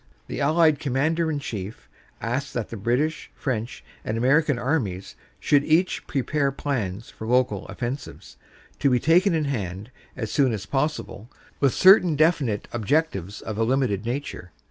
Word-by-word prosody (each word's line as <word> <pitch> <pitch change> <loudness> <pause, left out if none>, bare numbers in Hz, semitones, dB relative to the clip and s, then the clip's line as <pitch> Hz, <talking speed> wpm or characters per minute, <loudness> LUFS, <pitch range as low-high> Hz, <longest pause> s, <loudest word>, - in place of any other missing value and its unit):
The - - -5
Allied 155 0 +4
Commander 155 +5 0
in 150 - -1
Chief 105 -7 -6 0.3
asked 130 +5 -3
that 115 -3 -3
the - - -4
British, 125 +9 -1
French 120 - -4 0.2
and 110 - -2
American 135 +3 +3
Armies 120 - -2 0.2
should 145 -1 +3
each 165 +5 +1
prepare 140 +1 0
plans 115 -8 -3
for 110 - -8
local 125 +1 +1
offensives, 130 +3 -6 0.4
to 140 - +3
be 125 -1 +3
taken 170 +5 +4
in 155 -2 0
hand 105 -4 -4 0.3
as 110 -4 -4
soon 135 -5 +2
as 100 -2 -4
pos 150 +6 0
sible, 105 - -9 0.3
with 140 -3 +2
certain 185 -4 +6
definite 145 -9 +1
objectives 110 - -1
of 110 -1 -5
a - - +3
limited 120 -5 +1
nature. 120 -7 -5
130 Hz, 155 wpm, -24 LUFS, 110-150 Hz, 0.4 s, certain